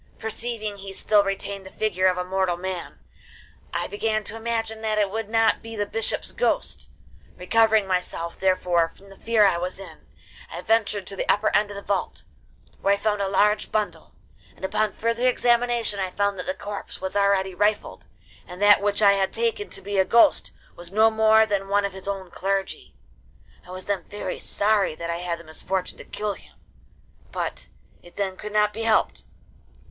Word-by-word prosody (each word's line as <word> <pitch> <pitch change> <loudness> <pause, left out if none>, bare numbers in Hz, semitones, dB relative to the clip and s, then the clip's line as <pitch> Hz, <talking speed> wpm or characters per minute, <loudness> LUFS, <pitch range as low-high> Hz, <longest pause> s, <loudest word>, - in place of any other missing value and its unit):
Perceiving 220 -1 -4
he 195 0 -8
still 205 +1 +3
retained 195 0 -3
the 190 - -10
figure 185 -3 +1
of 180 -1 +2
a 180 - -1
mortal 185 -1 0
man, 185 -1 -5 0.7
I - - -1
began 215 +1 -1
to 210 - -5
imagine 225 -1 -3
that 215 -1 -1
it 205 -2 +2
could 220 0 -3
not 225 0 +3
be 225 0 -8
the 205 -1 -1
bishop's 225 +1 -3
ghost; 480 - -1 0.5
recovering 220 +3 +3
myself 180 -2 -2
therefore 180 -3 +2
from 195 +1 -17
the 195 - -14
fear 225 -2 +3
I 175 -3 +3
was 180 +1 -4
in, 180 -5 -12 0.4
I - - -6
ventured 210 -3 +1
to 195 - -6
the - - -4
upper 215 +1 +3
end 205 0 +3
of 205 - -7
the 200 - -7
vault, 195 -2 -2 0.6
where 200 0 +4
I - - -7
found 210 0 0
a 195 - 0
large 210 +2 +2
bundle, 180 -7 -3 0.4
and - - -6
upon 215 +1 0
further 230 +2 0
examination 240 -3 +2
I 190 -1 -1
found 200 0 -1
that - - -5
the 280 - -1
corpse 205 0 -7
was 190 +1 -4
already 200 -1 +2
rifled, 205 +3 -1 0.4
and 180 0 -9
that 205 0 +6
which 205 +1 +1
I 200 - +8
had 195 -1 +1
taken 455 -3 -1
to - - -10
be 200 0 -1
a - - +6
ghost 235 +9 +4 0.2
was 175 0 -8
no 220 +2 +5
more 220 0 +5
than 200 -2 -1
one 200 +1 +2
of 200 - -4
his 190 0 -10
own 190 -3 -4
clergy. 195 - -3 0.7
I - - -15
was 185 0 -8
then 200 -3 -1
very 205 - -5
sorry 205 -5 +1
that 170 +1 -4
I 170 - -2
had 175 -1 -3
the 170 - -13
misfortune 180 +3 -4
to - - -10
kill 210 -1 -3
him, - - -17 0.8
but - - -4 0.3
it 175 - -17
then 195 -2 -2
could 210 +2 -7
not 210 0 +3
be 225 - -5
helped. 225 -1 +1
200 Hz, 195 wpm, -24 LUFS, 190-220 Hz, 0.8 s, I